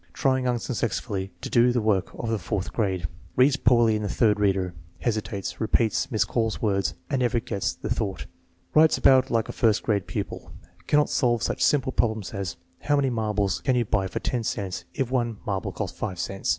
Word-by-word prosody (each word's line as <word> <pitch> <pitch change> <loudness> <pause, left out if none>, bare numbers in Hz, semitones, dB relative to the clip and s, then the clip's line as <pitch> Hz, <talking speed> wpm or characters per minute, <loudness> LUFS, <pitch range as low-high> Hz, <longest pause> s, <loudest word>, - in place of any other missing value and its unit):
Trying 130 -2 +1
unsuccessfully 115 -5 -2
to - - -5
do 120 +1 +5
the 120 - +1
work 105 -4 +1
of 115 - -4
the 110 - 0
fourth 100 +3 -3
grade. 95 -6 0 0.3
Reads 135 +2 +5
poorly 120 -4 +4
in 105 - -2
the 105 - -2
third 105 -1 +2
reader. 95 -3 +1 0.3
Hesitates, 105 -4 -3
repeats, 110 -1 +1
miscalls 115 0 0
words, 100 -5 0 0.2
and 135 - +1
never 120 -1 +2
gets 100 -4 -2
the - - -7
thought. 100 -3 -2 0.5
Writes 155 +1 +5
about 130 -1 +5
like 115 -1 +1
a - - -4
first 110 -3 +2
grade 100 -4 0
pupil. - - -5 0.3
Cannot 150 0 +3
solve 120 -3 +2
such - - -2
simple 135 -3 +3
problems 110 -5 -1
as 100 -4 -3 0.2
"How 145 - +1
many 135 -2 +2
marbles 105 -4 0
can 130 - +1
you 120 -1 +2
buy 100 -2 0
for - - -4
ten 120 -2 -2
cents 100 -4 -3
if 130 -4 -1
one 120 -4 0
marble 95 -4 -2
costs - - -5
five 90 - -3
cents?" 95 +3 -3
110 Hz, 190 wpm, -25 LUFS, 100-125 Hz, 0.5 s, do